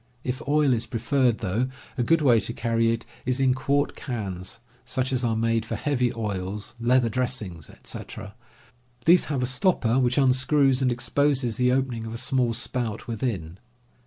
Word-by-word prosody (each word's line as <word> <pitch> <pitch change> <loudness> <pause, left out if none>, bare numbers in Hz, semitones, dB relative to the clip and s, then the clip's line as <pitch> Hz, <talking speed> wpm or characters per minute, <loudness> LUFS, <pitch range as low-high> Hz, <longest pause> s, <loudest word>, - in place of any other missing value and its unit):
If 130 +3 -3
oil 145 -2 +3
is 115 0 -1
preferred, 120 +1 +1
though, 115 +8 0 0.3
a - - -1
good 160 +6 +3
way 120 -5 +5
to 115 - -1
carry 115 -1 +1
it 115 0 -3 0.2
is 130 +1 -1
in 130 -1 +4
quart 140 +2 0
cans 100 -7 -5 0.3
such 130 0 -2
as 130 0 0
are 115 -2 +1
made 115 0 +1
for 115 0 -4
heavy 125 0 0
oils, 100 -2 -4
leather 120 +1 +3
dressings, 115 - -3
etc. 105 -2 -8 0.7
These 175 +2 +6
have 140 -4 -1
a - - +2
stopper 130 - +1
which 125 -1 +1
unscrews 135 0 +3
and 130 -1 +2
exposes 130 -1 +1
the 125 -1 +3
opening 125 -4 -1
of 110 - -6
a - - -4
small 125 -1 +1
spout 120 -2 -3
within. 100 -8 -3
125 Hz, 170 wpm, -25 LUFS, 115-130 Hz, 0.7 s, These